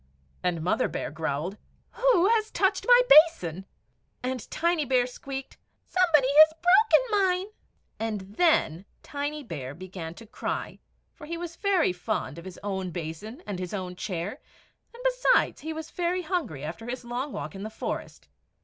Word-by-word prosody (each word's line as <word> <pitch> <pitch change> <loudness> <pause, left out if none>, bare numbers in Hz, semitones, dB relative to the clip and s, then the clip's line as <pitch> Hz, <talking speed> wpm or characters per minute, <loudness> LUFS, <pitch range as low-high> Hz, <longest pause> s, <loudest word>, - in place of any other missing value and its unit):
And 170 -3 -1
Mother 180 - +1
Bear - - -4
growled, 155 +5 -3 0.3
"WHO 475 -7 +3
HAS 445 -1 +2
TOUCHED - - 0
MY - - +8
BASIN?" 250 - +5 0.6
And 255 -2 -3
Tiny 340 -1 +1
Bear 255 -2 +2
squeaked, 270 +2 -7 0.3
"SOMEBODY 330 -7 +3
HAS 315 0 +9
BROKEN 425 +7 +5 0.2
MINE!" 365 +1 0 0.5
And 220 -2 -2
then 200 - +2 0.2
Tiny 290 +1 -4
Bear 145 - -6
began 175 -3 -8
to 230 - -12
cry, 220 - -4 0.3
for 300 - -12
he 335 +1 -4
was 340 -1 -6
very 380 - +2
fond 180 -5 -3
of 170 - -12
his 185 -1 -9
own 190 -2 -2
basin 180 - -7
and 195 -3 -4
his 180 +2 -4
own 180 -2 -5
chair; 180 - -4 0.5
and, 475 +1 -12
besides, - - +2
he 315 - -4
was 320 0 -6
very 355 +1 -1
hungry 310 - -3
after 170 +9 -6
his 250 0 -5
long 250 +4 -3
walk - - -5
in 195 - -8
the 215 - -4
forest. 220 - -6
250 Hz, 160 wpm, -27 LUFS, -, 0.6 s, HAS